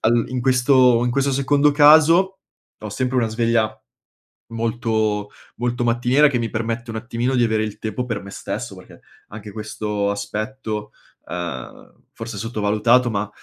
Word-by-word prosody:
al 115 +1 +2
in 125 -1 -3
questo 125 -1 +4
in 125 - 0
questo 140 +2 0
secondo 140 +2 +3
caso, 160 +6 +5 0.4
ho 105 - -6
sempre 130 +4 -2
una 120 -2 +2
sveglia 115 -1 0 0.7
molto 110 -2 -1 0.3
molto 120 0 -1
mattiniera 120 +5 +3
che 130 - -1
mi 115 -1 -2
permette 115 +2 -3
un 110 - -4
attimino 120 +2 -2
di 120 - +3
avere 110 -1 0
il 105 -1 -6
tempo 110 +3 -3
per 115 -3 -4
me 100 - -11
stesso - - -6
perché - - -15 0.3
anche 105 0 -9
questo 105 -1 -3
aspetto, 105 +1 -4 0.4
uhm, 85 -8 -7 0.2
forse 115 -2 -7
sottovalutato, 115 +3 +2
ma 105 -1 -2
115 Hz, 150 wpm, -21 LUFS, 110-125 Hz, 0.7 s, caso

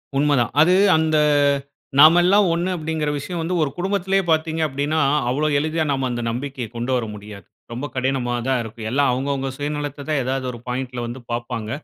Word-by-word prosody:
உண்மதான். 140 -3 +2
அது 180 +3 +5 0.2
அந்த 160 -1 +1 0.8
"நாமெல்லாம் 175 +6 +6
ஒண்ணு" 170 +2 -1
அப்டீங்குற 155 -1 -2
விஷயம் 170 +4 -4
வந்து 170 +3 -2
ஒரு 150 - +1
குடும்பத்திலயே 195 +1 0
பாத்தீங்க 160 0 0
அப்டீன்னா 145 +3 -1 0.3
அவ்ளோ 150 +5 0
எளிதா 155 +1 -1
நாம 135 -1 0
அந்த 120 0 -3
நம்பிக்கைய 130 +1 -4
கொண்டு 120 +2 -3
வர 120 - -1
முடியாது. 105 -1 -11 0.3
ரொம்ப 125 +5 -4
கடினமானதா 130 -1 -1
இருக்கும். 110 0 -7
எல்லாம் 140 +1 +2
அவுங்கவுங்க 135 +1 -2
சுயநலத்த 145 -1 -4
தான் 145 -3 +1
ஏதாவது 130 +1 -2
ஒரு 120 - -10
பாயிண்ட்‌ல 125 0 -4
வந்து 120 +2 -7
பாப்பாங்க. 120 -2 -4
140 Hz, 160 wpm, -21 LUFS, 125-160 Hz, 0.8 s, நாமெல்லாம்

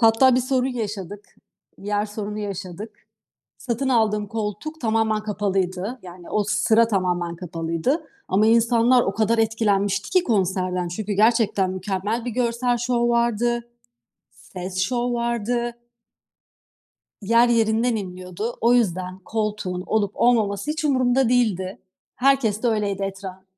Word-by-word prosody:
Hatta 235 +3 +5
bir 255 - +3
sorun 255 0 0
yaşadık. 205 -5 -5 0.5
Yer 205 +1 -1
sorunu 210 0 -5
yaşadık. 205 +1 -6 0.6
Satın 255 +2 -2
aldığım 210 -4 +2
koltuk 225 +10 -5
tamamen 220 -2 +1
kapalıydı. 195 +1 -2
Yani 175 -1 -11
o 210 -1 +1
sıra 220 +3 +3
tamamen 175 -4 -1
kapalıydı 170 - -2 0.2
ama 205 +3 +3
insanlar 235 +2 +4
o 195 - -2
kadar 225 +2 +1
etkilenmişti 205 -3 +1
ki 370 -1 +3
konserden 185 -4 0
çünkü 205 +3 -4
gerçekten 210 -3 +2
mükemmel 195 +5 -3
bir 245 - -2
görsel 240 +1 0
şov 240 0 +1
vardı, 235 0 +1 0.6
ses 185 0 -8
şov 240 +5 0
vardı. 235 0 -1 1.5
Yer 230 +4 +4
yerinden 230 +1 +2
inliyordu. 185 +3 -5
O 235 +2 +4
yüzden 185 -5 0
koltuğun 210 -3 -3
olup 205 -2 0
olmaması 220 0 +2
hiç 310 +1 -3
umurumda 255 -2 +2
değildi. 205 -7 0 0.4
Herkes 250 -5 +2
de - - +3
öyleydi 205 -3 0
etraf 195 -1 -6
215 Hz, 125 wpm, -23 LUFS, 195-235 Hz, 1.5 s, Hatta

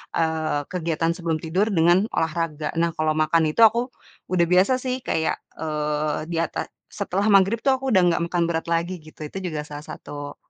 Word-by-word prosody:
eee, 160 -2 0
kegiatan 165 -2 0
sebelum 165 -3 -1
tidur 180 +6 0
dengan 175 +3 +4
olahraga. 160 -2 -1
Nah, 170 0 +2
kalau 155 0 +1
makan 155 +1 +3
itu, 155 - 0
aku 235 +3 +2 0.4
udah 175 -2 +3
biasa 185 +7 +4
sih, 255 0 -2
kayak, 160 - 0 0.2
eee, 150 0 -2
di 170 - -2
ata 165 - -3 0.2
setelah 200 0 -2
maghrib 195 +3 +5
tuh, 270 - +5
aku 270 - -1
udah 190 - +6
gak 170 - 0
makan 175 -1 +1
berat 165 0 -2
lagi, 170 +2 -1
gitu. 155 0 -15
Itu 170 - -9
juga 155 -4 -3
salah 150 0 -8
satu, 145 0 -8
165 Hz, 185 wpm, -23 LUFS, 155-185 Hz, 0.4 s, udah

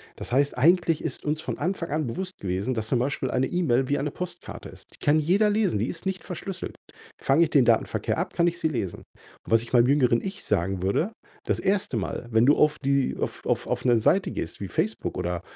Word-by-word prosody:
Das - - -7
heißt, 140 +2 +2
eigentlich 165 +3 +3
ist 150 -5 -4
uns 155 +1 -1
von - - -4
Anfang 180 -2 -2
an 155 -2 -1
bewusst 185 +10 -4
gewesen, 95 +6 -2
dass 110 -1 -2
zum 120 - +1
Beispiel 130 +1 -1
eine 130 +1 +1
E-Mail 135 -8 +1
wie 145 - +2
eine 145 +1 -2
Postkarte 180 +1 -7
ist. - - -13
Die - - -14
kann 150 +2 +4
jeder 190 +8 +3
lesen, 205 - +1
die 110 - 0
ist 165 - -6
nicht 190 -1 -2
verschlüsselt. 185 +1 -6 0.4
Fange 145 +5 +3
ich 165 - +1
den 140 -6 +4
Datenverkehr 115 -1 +1
ab, - - -3
kann 170 - +2
ich 175 0 -1
sie 160 - +1
lesen. 115 - -3
Und - - -18
was 115 0 +4
ich 115 - -12
meinem 120 -1 +5
jüngeren 125 -4 +3
Ich 195 +1 -6
sagen 95 +2 0
würde: 130 - +1 0.3
Das - - 0
1. 195 - 0
Mal, 105 +3 -4
wenn 110 +1 +4
du 145 - +6
auf 150 0 +3
die 140 -1 +1
auf - - -4
auf - - 0
auf - - -2
'ne 120 -2 +4
Seite 190 - +2
gehst 85 - -5
wie 100 - -3
Facebook - - -2
oder, 90 0 -2
145 Hz, 230 wpm, -26 LUFS, 120-175 Hz, 0.4 s, du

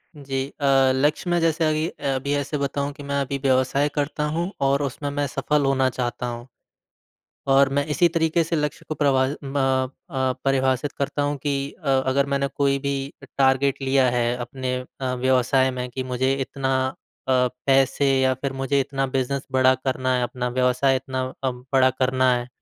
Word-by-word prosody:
जी। 135 -2 -3
अ, 140 - +1 0.3
लक्ष्य 150 +6 0
में 175 0 +2
जैसे 165 0 +2
अगी 155 +1 +1
अ, - - -16
अभी 140 +2 -2
ऐसे 145 +1 -1
बताऊँ 140 0 -2
कि 145 -1 -11
मैं 140 0 -1
अभी 140 0 -2
व्यवसाय 135 +2 +2
करता 150 +1 -1
हूँ 175 +3 -1
और 140 +1 +2
उसमें 140 +1 -3
मैं 145 0 -1
सफल 140 +2 0
होना 135 -1 +2
चाहता 125 0 -3
हूँ। 120 0 -6 1.1
और 135 0 +5
मैं 145 0 +1
इसी 170 +4 +3
तरीक़े 165 0 +1
से 165 +1 -2
लक्ष्य 150 -2 -2
को 155 - -2
प्रभा 135 -3 +3
म 135 -2 -1 0.2
अ, 130 -3 0
परिभाषित 135 +1 +1
करता 140 0 -2
हूँ 145 0 0
कि 140 0 -2
अ, - - -6 0.2
अगर 140 +1 +2
मैंने 140 0 0
कोई 140 -1 +2
भी 140 0 -3 0.2
टारगेट 135 0 +2
लिया 135 -1 +3
है, 120 0 0
अपने 125 +1 -4 0.3
अ, 130 -1 -1
व्यवसाय 130 +1 +2
में 125 0 -4
कि 130 +2 -4
मुझे 130 +1 0
इतना 135 0 -1
अ, - - -5 0.4
पैसे 130 +2 +2 0.2
या 130 0 +3
फिर 135 +1 -4
मुझे 135 +1 0
इतना 135 0 -1
बिज़नेस 135 +1 -1
बड़ा 130 0 +4
करना 130 0 -1
है, 125 - 0
अपना 125 0 -3
व्यवसाय 125 +2 +2
इतना 130 0 -3 0.2
अ, 130 - +1
बड़ा 130 +1 +2
करना 130 0 +2
है। 120 0 -4
135 Hz, 185 wpm, -23 LUFS, 130-140 Hz, 1.1 s, और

